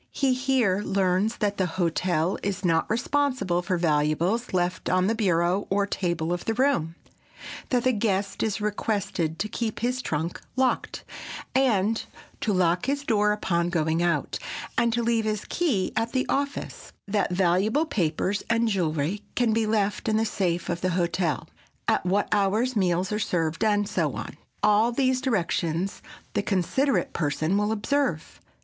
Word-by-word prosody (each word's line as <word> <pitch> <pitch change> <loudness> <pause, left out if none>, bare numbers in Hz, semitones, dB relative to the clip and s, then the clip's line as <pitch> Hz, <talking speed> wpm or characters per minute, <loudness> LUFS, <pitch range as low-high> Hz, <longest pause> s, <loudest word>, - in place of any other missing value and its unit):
He 270 -2 +2
here 250 -7 +1
learns 195 +2 +1
that 205 -1 -1
the 185 - +1
hotel 175 0 0
is 195 -1 -3
not 165 -2 +2
responsible 250 -6 +1
for 180 +1 -1
valuables 165 +7 +1
left 180 0 -1
on 185 +1 +3
the 220 - +2
bureau 185 -3 +1
or 200 +1 +2
table 175 -4 -1
of 175 - -4
the 225 - 0
room, 245 - +1 0.7
that 245 -2 +1
the 255 - +4
guest 200 -3 -1
is 220 -1 0
requested 205 -6 -1
to 210 - -1
keep 220 0 -3
his 250 +2 0
trunk 160 -4 -3
locked, 260 0 0 0.5
and 225 -5 +2 0.4
to 220 - 0
lock 180 +2 +2
his 280 +1 0
door 210 -5 +2
upon 175 -4 0
going 160 -1 +1
out, 175 -1 0 0.4
and 235 0 +2
to 235 +1 0
leave 230 -1 +1
his 215 -1 -2
key 265 - 0
at 225 +1 -1
the 260 -1 +1
office; 280 0 -3 0.2
that 205 0 +1
valuable 190 - +2
papers 185 - 0
and 230 0 +2
jewelry 170 -1 -1
can 240 -3 +2
be 225 0 +1
left 210 -1 0
in 215 - +2
the 225 - +2
safe 180 -5 -1
of 170 0 -2
the 185 - +1
hotel; 170 -3 0 0.4
at - - +2
what 200 +3 +2
hours 215 +5 +2
meals 185 -1 +1
are 210 - 0
served 170 -3 -1
and 205 -1 +2
so 210 - -1
on. - - -6 0.3
All 210 +3 +4
these 255 0 +1
directions 185 - -1 0.3
the - - +1
considerate 205 - 0
person 155 +3 0
will 210 +1 +1
observe. 220 - -1
200 Hz, 160 wpm, -26 LUFS, 175-230 Hz, 0.7 s, the